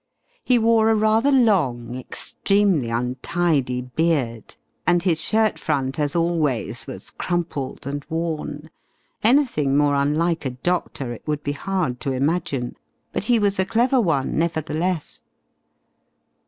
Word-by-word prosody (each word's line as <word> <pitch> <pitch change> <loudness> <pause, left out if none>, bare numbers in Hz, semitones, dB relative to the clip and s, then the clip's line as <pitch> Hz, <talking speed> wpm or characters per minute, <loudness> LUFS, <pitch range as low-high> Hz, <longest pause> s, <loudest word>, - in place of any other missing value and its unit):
He 250 - +3
wore 225 -1 +4
a 225 - +4
rather 220 +5 +3
long, 150 - +2
extremely 185 - 0
untidy 125 +2 0
beard, 125 -4 -1 0.3
and 175 -1 +3
his 165 -4 +1
shirt 220 +2 +2
front 135 -2 -1
as 145 +2 0
always 165 -7 0
was - - -9
crumpled 165 -8 -3
and 140 +1 -4
worn. 160 -2 -4 0.5
Anything 220 - +3
more 145 -1 +3
unlike 155 +4 +1
a 135 - -1
doctor 135 -2 -2
it 120 - -10
would 150 -1 -2
be 145 - -1
hard 150 -5 -2
to 135 -3 -2
imagine. 135 -2 -1 0.4
But - - -2
he 240 +1 +4
was 200 -2 +1
a - - +4
clever 245 +5 +2
one, 155 -8 0
nevertheless. 165 +1 -2
160 Hz, 130 wpm, -22 LUFS, 135-190 Hz, 0.5 s, wore